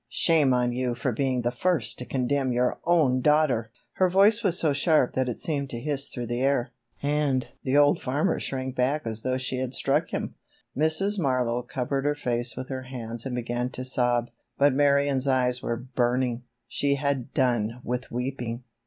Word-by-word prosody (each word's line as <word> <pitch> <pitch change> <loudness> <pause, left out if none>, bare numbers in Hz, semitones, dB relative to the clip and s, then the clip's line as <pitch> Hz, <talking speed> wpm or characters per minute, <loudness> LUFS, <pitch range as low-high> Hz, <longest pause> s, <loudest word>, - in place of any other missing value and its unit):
Shame 155 -5 +3
on 125 -1 +2
you 125 -1 -1
for 130 +2 -1
being 130 +1 0
the 120 - +1
first 125 -6 0
to 125 - -5
condemn 130 +1 0
your 125 +1 0
own 150 -7 +3
daughter!" 145 -6 +2 0.3
Her 185 -1 +4
voice 205 +5 +4
was 185 -6 +1
so 155 -5 +2
sharp 150 -2 +2
that 130 -1 0
it 120 - -4
seemed 140 -4 -2
to 120 - -5
hiss 140 +1 -2
through 120 -2 -5
the 120 +1 -2
air, 135 -2 +1 0.3
and 145 -3 +1
the 135 +2 +1
old 145 0 +4
farmer 145 +8 0
shrank 130 -1 -4
back 135 +3 0
as 110 -1 -3
though 130 +1 -1
she 130 0 -3
had 130 0 -2
struck - - +1
him. - - -3 0.4
Mrs. 175 +8 +1
Marlowe 125 -5 +1
covered 135 +3 -3
her 145 0 +2
face 120 -3 -2
with 130 - -5
her 130 -1 -4
hands 120 -1 -6
and 125 - -3
began 120 0 -2
to 130 0 -6
sob, 120 -2 0 0.3
but 140 -1 +4
Marion's 140 -1 +2
eyes 125 -1 +2
were 115 - -2
burning—she 125 +1 -1
had 140 -3 -2
done 120 -3 +1
with 125 +1 -3
weeping. 125 -1 -4
130 Hz, 185 wpm, -26 LUFS, 125-140 Hz, 0.4 s, Her